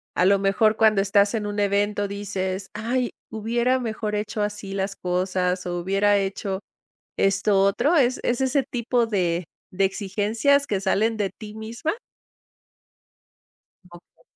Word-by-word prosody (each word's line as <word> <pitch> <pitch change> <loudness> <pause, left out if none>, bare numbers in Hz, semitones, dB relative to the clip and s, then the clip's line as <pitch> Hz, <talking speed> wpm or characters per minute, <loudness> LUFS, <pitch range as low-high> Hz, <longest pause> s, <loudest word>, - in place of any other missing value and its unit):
A 180 - +3
lo 200 +1 +5
mejor 210 +2 +2
cuando 215 -3 +4
estás 200 +2 +3
en 215 -2 -2
un 205 0 -3
evento 205 0 +1
dices: 190 -1 -3
"Ay, 240 +3 -1 0.2
hubiera 235 +4 0
mejor 220 -2 -3
hecho 210 +1 -3
así 205 -1 -4
las 195 0 -2
cosas 180 0 -1
o 175 0 -2
hubiera 195 +3 +2
hecho 195 0 -3 0.6
esto 195 0 +3
otro", 285 - +2
¿es 255 -3 +3
es 245 +1 0
ese 265 +1 +2
tipo 240 -1 0
de 180 -5 0 0.3
de 195 +1 +1
exigencias 215 +9 +1
que 200 -2 -1
salen 215 +3 +1
de 200 -3 -1
ti 210 +1 -11
misma? 230 +8 -3 2.0
Okey. 175 -1 -17
205 Hz, 140 wpm, -24 LUFS, 195-225 Hz, 2.0 s, lo